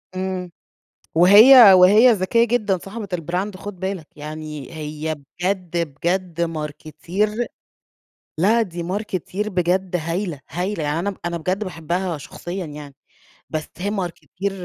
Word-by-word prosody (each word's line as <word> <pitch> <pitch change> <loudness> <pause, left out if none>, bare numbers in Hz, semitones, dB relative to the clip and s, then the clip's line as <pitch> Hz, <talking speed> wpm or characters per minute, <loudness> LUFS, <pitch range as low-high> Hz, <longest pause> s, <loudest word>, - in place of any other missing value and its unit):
إمم، 185 -1 -3 0.6
وهي 205 +5 +9
وهي 205 +7 +7
ذكية 215 +3 +2
جدًا 215 -5 +1
صاحبة 200 +3 -7
البراند، 180 +4 -3
خد 195 -2 -8
بالك 190 -4 -4
يعني، 150 0 -7
هي 155 0 -4 0.3
بجد 180 -2 -1 0.2
بجد 170 +2 -2
Marketeer، 175 +9 -3 0.9
لأ 220 +7 +3
دي 175 -5 -4
Marketeer 195 +1 -3
بجد 180 -1 0
هايلة، 170 -1 -2
هايلة 180 -1 -3
يعني، 150 +3 -1
أنا 200 +1 -2
أنا 170 0 -2
بجد 185 +6 -2
باحبها 175 -1 -3
شخصيًا 175 +5 -6
يعني، 145 -2 -10 0.5
بس 155 -1 -3
هي 195 +3 -2
Marketeer 190 0 -4
180 Hz, 125 wpm, -21 LUFS, 165-200 Hz, 0.9 s, وهي